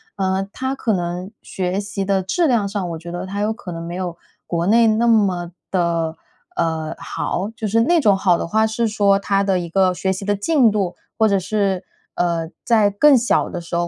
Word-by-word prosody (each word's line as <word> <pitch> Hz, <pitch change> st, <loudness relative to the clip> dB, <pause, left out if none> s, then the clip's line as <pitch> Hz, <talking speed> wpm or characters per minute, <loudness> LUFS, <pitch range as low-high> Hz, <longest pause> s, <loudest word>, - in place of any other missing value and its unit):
呃， 190 Hz, 0 st, -1 dB
它 260 Hz, +1 st, -2 dB
可 230 Hz, -5 st, -1 dB
能 180 Hz, +1 st, -3 dB
学 185 Hz, +1 st, -2 dB
习 200 Hz, -1 st, -4 dB
的 195 Hz, -1 st, +1 dB
质 330 Hz, -, +1 dB
量 225 Hz, -6 st, +2 dB
上， 195 Hz, -3 st, -3 dB
我 165 Hz, -, -4 dB
觉 170 Hz, +1 st, -9 dB
得 175 Hz, +2 st, -5 dB
它 200 Hz, +2 st, -3 dB
有 215 Hz, -, +1 dB
可 200 Hz, -5 st, -9 dB
能 165 Hz, 0 st, -6 dB
没 170 Hz, +1 st, -6 dB
有 180 Hz, -2 st, -4 dB, 0.3 s
国 170 Hz, -1 st, -1 dB
内 230 Hz, +2 st, +5 dB
那 220 Hz, +2 st, +2 dB
么 190 Hz, -6 st, +2 dB, 0.2 s
的， 170 Hz, -3 st, 0 dB, 0.4 s
呃， 160 Hz, -1 st, -1 dB
好？ 195 Hz, +4 st, -3 dB
就 220 Hz, -, -5 dB
是 225 Hz, +3 st, +2 dB
那 340 Hz, +7 st, +3 dB
种 210 Hz, -6 st, +4 dB
好 180 Hz, -3 st, +3 dB
的 -, -, -3 dB
话， 220 Hz, +5 st, +2 dB
是 230 Hz, +1 st, -1 dB
说 200 Hz, -2 st, +3 dB
它 200 Hz, 0 st, 0 dB
的 195 Hz, -2 st, +1 dB
一 170 Hz, -1 st, -5 dB
个 185 Hz, +1 st, +3 dB
学 190 Hz, +1 st, -1 dB
习 190 Hz, +1 st, -6 dB
的 205 Hz, 0 st, +1 dB
进 255 Hz, +3 st, +3 dB
度， 195 Hz, -4 st, -1 dB, 0.2 s
或 220 Hz, -, +4 dB
者 200 Hz, -2 st, +2 dB
是， 195 Hz, -1 st, -1 dB, 0.3 s
呃， 170 Hz, -2 st, -1 dB, 0.2 s
在 220 Hz, -3 st, +4 dB
更 265 Hz, +7 st, +5 dB
小 240 Hz, -, +1 dB
的 175 Hz, -, -5 dB
时 170 Hz, -, -13 dB
候， 175 Hz, 0 st, 0 dB
195 Hz, 235 characters per minute, -20 LUFS, 175-215 Hz, 0.4 s, 内